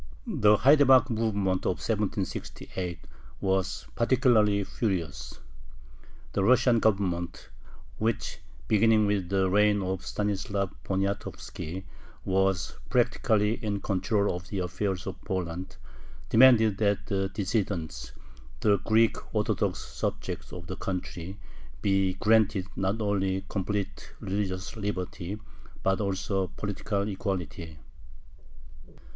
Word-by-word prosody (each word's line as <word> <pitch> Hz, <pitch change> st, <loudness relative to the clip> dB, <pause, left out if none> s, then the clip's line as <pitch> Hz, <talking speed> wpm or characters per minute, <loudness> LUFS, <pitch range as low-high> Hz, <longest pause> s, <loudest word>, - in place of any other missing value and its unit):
The 105 Hz, 0 st, +4 dB
haidamack 135 Hz, -2 st, +6 dB
movement 100 Hz, -5 st, 0 dB
of 90 Hz, -, +1 dB
1768 95 Hz, -4 st, -3 dB, 0.4 s
was 95 Hz, -1 st, 0 dB
particularly 115 Hz, -5 st, +3 dB
furious. 90 Hz, -, -3 dB, 0.9 s
The 100 Hz, -, +1 dB
Russian 125 Hz, +1 st, +5 dB
Government, 95 Hz, -6 st, 0 dB, 0.5 s
which, 110 Hz, 0 st, -1 dB, 0.3 s
beginning 110 Hz, 0 st, +4 dB
with 100 Hz, -3 st, 0 dB
the 95 Hz, -1 st, +2 dB
reign 105 Hz, +1 st, +3 dB
of 95 Hz, 0 st, -2 dB
Stanislav 100 Hz, -1 st, -2 dB
Poniatovski, 95 Hz, -2 st, -3 dB, 0.4 s
was 95 Hz, -2 st, +1 dB
practically 115 Hz, -3 st, +2 dB
in 100 Hz, -2 st, -1 dB
control 100 Hz, 0 st, 0 dB
of 90 Hz, +1 st, -7 dB
the 100 Hz, -, -4 dB
affairs 95 Hz, +1 st, -2 dB
of 95 Hz, -, -6 dB
Poland, 90 Hz, -2 st, -4 dB, 0.5 s
demanded 110 Hz, -4 st, +6 dB
that 100 Hz, -2 st, +1 dB
the 95 Hz, -3 st, -1 dB
"dissidents," 95 Hz, -4 st, -2 dB, 0.5 s
the 100 Hz, -1 st, +4 dB
Greek 110 Hz, +3 st, +3 dB, 0.2 s
Orthodox -, -, +1 dB
subjects -, -, -4 dB
of 90 Hz, -1 st, -8 dB
the 95 Hz, +3 st, -6 dB
country, 90 Hz, 0 st, -5 dB, 0.5 s
be 95 Hz, -2 st, +2 dB
granted 105 Hz, -2 st, +3 dB
not 95 Hz, +3 st, -1 dB
only 95 Hz, -2 st, 0 dB
complete 100 Hz, 0 st, -3 dB
religious 95 Hz, 0 st, -3 dB
liberty, 100 Hz, -2 st, -4 dB, 0.5 s
but 95 Hz, +2 st, +2 dB
also 95 Hz, -1 st, -1 dB
political 100 Hz, 0 st, -2 dB
equality. 90 Hz, -6 st, -4 dB
100 Hz, 105 wpm, -28 LUFS, 95-105 Hz, 0.9 s, haidamack